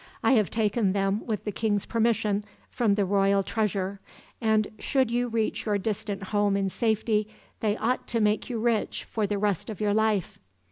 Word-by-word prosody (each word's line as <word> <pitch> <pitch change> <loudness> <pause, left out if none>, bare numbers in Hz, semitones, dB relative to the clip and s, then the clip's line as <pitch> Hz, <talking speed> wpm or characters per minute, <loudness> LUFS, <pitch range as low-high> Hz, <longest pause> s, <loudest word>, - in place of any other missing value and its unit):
I - - +4
have 215 -7 +4
taken 215 -2 +1
them, 195 +1 0
with 215 -3 -2
the 210 - -2
king's 205 0 0
permission, 220 -3 +1 0.3
from 220 -5 +2
the 200 -1 +1
royal 195 0 +3
treasure; 200 -2 -1 0.4
and 220 -2 +2
should 260 -4 +1
you 245 +1 +1
reach 225 -1 -1
your 205 -1 +2
distant 205 -1 -3
home 205 0 +1
in 195 -1 0
safety, 215 0 0 0.3
they 215 -1 0
ought 250 +3 -1
to 230 - 0
make 210 +3 +1
you 240 - -2
rich 230 -1 0
for 215 -2 -2
the 205 0 -1
rest 200 -2 -1
of 215 - -6
your 210 -1 +1
life. 215 -3 +1
210 Hz, 185 wpm, -27 LUFS, 200-225 Hz, 0.4 s, I